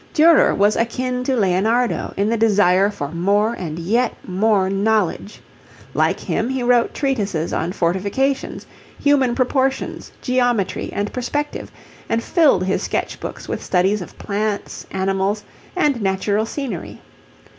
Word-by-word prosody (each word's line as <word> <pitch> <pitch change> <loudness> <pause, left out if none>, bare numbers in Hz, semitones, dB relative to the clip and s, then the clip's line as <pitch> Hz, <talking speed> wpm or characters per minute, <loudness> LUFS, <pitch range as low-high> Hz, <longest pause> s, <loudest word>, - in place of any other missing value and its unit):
Durer 325 +1 +5
was 205 +1 +3
akin 250 +2 -1
to 265 -1 +1
Leonardo 220 +5 +1
in 200 +1 +1
the - - +2
desire 205 -3 +4
for 145 -9 -5
more 200 +7 +1
and 165 -8 -5
yet 225 +8 0
more 195 +1 +2
knowledge. 200 0 0 0.5
Like - - +1
him 225 - -2
he 265 -1 -2
wrote 240 -1 +2
treatises 205 - -1
on 170 - -1
fortifications, 200 +10 -1 0.3
human 270 -4 +3
proportions, 265 +1 -1
geometry, 245 -5 0
and 205 +1 -3
perspective, 290 +4 -3 0.4
and 230 0 0
filled 315 - +3
his 190 +1 0
sketchbooks - - -4
with - - -4
studies 190 +3 +1
of 180 - -10
plants, 205 0 -3
animals, 195 +2 -1 0.3
and 295 -9 +1
natural 200 +2 0
scenery. 275 +1 -5
215 Hz, 130 wpm, -20 LUFS, 195-250 Hz, 0.5 s, Durer